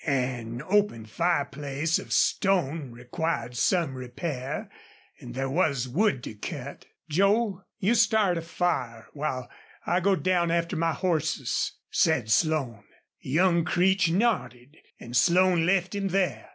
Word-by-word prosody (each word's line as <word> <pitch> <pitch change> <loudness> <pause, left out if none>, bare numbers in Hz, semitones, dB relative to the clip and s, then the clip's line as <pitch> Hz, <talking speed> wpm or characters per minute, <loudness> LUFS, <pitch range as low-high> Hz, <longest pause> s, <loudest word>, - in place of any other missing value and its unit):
An 125 -4 -2
open 200 - +1
fireplace 145 +1 -1
of - - -10
stone 165 -7 +1
required 125 +1 -4
some 160 - +1
repair 130 +1 -5 0.5
and - - -10
there 135 +1 -1
was 140 -4 0
wood 160 - +1
to - - -6
cut. 140 - -7 0.2
"Joel, 200 +4 +1
you 205 +5 +2
start 215 -4 +3
a - - -5
fire 145 -9 -2
while 140 -4 -3 0.4
I 175 - +2
go 195 +2 +2
down 180 -2 +1
after 170 +2 0
my 165 0 +1
horses," 155 -5 -1 0.2
said 135 -9 +2
Slone. 130 -5 +1 0.4
Young 170 +4 +2
Creech 190 +2 +2
nodded 165 - -1 0.2
and 120 +1 -8
Slone 180 +1 +4
left 190 0 +1
him 200 -1 -1
there. 180 - -1
160 Hz, 130 wpm, -27 LUFS, 130-185 Hz, 0.5 s, Slone